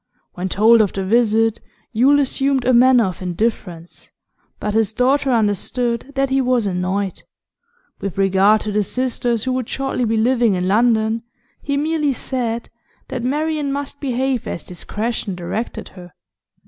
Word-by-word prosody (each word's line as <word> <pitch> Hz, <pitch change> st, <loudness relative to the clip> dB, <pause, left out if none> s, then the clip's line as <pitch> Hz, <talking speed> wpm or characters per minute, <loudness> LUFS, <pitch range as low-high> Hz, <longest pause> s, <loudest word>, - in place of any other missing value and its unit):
When 185 Hz, +1 st, -4 dB
told 220 Hz, +4 st, +5 dB
of 205 Hz, -, 0 dB
the 195 Hz, -1 st, -3 dB
visit, 225 Hz, +1 st, +2 dB, 0.3 s
Yule 270 Hz, +6 st, +4 dB
assumed 275 Hz, -1 st, +1 dB
a 255 Hz, -, +3 dB
manner 250 Hz, 0 st, +6 dB
of 185 Hz, -1 st, -5 dB
indifference, 180 Hz, -2 st, -4 dB, 0.5 s
but 210 Hz, -, -2 dB
his 220 Hz, 0 st, +1 dB
daughter 270 Hz, +4 st, +2 dB
understood 235 Hz, +3 st, 0 dB
that 270 Hz, 0 st, 0 dB
he 270 Hz, 0 st, +3 dB
was 250 Hz, -3 st, +1 dB
annoyed. 190 Hz, +1 st, -2 dB, 0.8 s
With 195 Hz, -3 st, -5 dB
regard 195 Hz, +2 st, +4 dB
to 215 Hz, -, -3 dB
the 210 Hz, +1 st, +1 dB
sisters 240 Hz, +1 st, -1 dB
who 260 Hz, -, -1 dB
would 255 Hz, -2 st, -3 dB
shortly 270 Hz, -2 st, -1 dB
be 225 Hz, 0 st, 0 dB
living 235 Hz, -2 st, +2 dB
in 180 Hz, 0 st, -1 dB
London, 220 Hz, +1 st, +2 dB, 0.4 s
he 280 Hz, -1 st, -2 dB
merely 300 Hz, -1 st, 0 dB
said 235 Hz, -3 st, -3 dB, 0.4 s
that 250 Hz, -, -4 dB
Marian 295 Hz, +2 st, -1 dB
must 285 Hz, 0 st, -5 dB
behave 260 Hz, -2 st, -1 dB
as -, -, -5 dB
discretion 210 Hz, +2 st, -4 dB
directed 180 Hz, +7 st, -5 dB
her. 180 Hz, -3 st, -14 dB
230 Hz, 150 wpm, -19 LUFS, 205-260 Hz, 0.8 s, manner